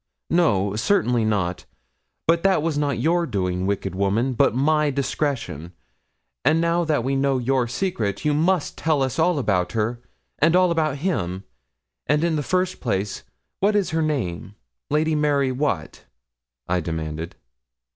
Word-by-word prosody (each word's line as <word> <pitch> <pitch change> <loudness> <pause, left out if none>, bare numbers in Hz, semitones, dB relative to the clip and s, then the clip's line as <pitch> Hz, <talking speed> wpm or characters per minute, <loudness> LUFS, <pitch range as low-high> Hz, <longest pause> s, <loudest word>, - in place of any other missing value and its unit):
'No, 105 - +2
certainly 120 - +2
not; 100 -5 -1 0.6
but 165 +1 +3
that 190 -5 +2
was 165 -2 0
not 145 -3 0
your 170 +2 +1
doing, 95 -4 -1
wicked 100 -2 -2
woman, 100 +7 0
but 115 - +2
my 150 +3 +2
discretion. 135 - -2 0.7
And 155 +4 +3
now 170 +1 +2
that 150 -6 0
we 135 +2 0
know 135 0 +1
your 125 0 +1
secret, 120 - -2
you 150 - +3
must 165 +2 0
tell 155 -3 +1
us 130 +4 -2
all 170 0 +3
about 95 -9 0
her, 115 +2 -1 0.4
and 165 +3 +4
all 180 -1 +4
about 155 -4 0
him; 95 - -1 0.6
and 150 +2 +2
in 170 -2 +1
the 150 - 0
first 185 +4 -1
place, 100 -4 -2 0.4
what 205 +2 +2
is 200 -4 +1
her 160 0 0
name 105 - -2 0.3
Lady 155 +2 +1
Mary 145 -3 +2
what?' 125 - -2 0.6
I 90 +1 +1
demanded. 80 -1 -4
135 Hz, 155 wpm, -23 LUFS, 100-160 Hz, 0.7 s, and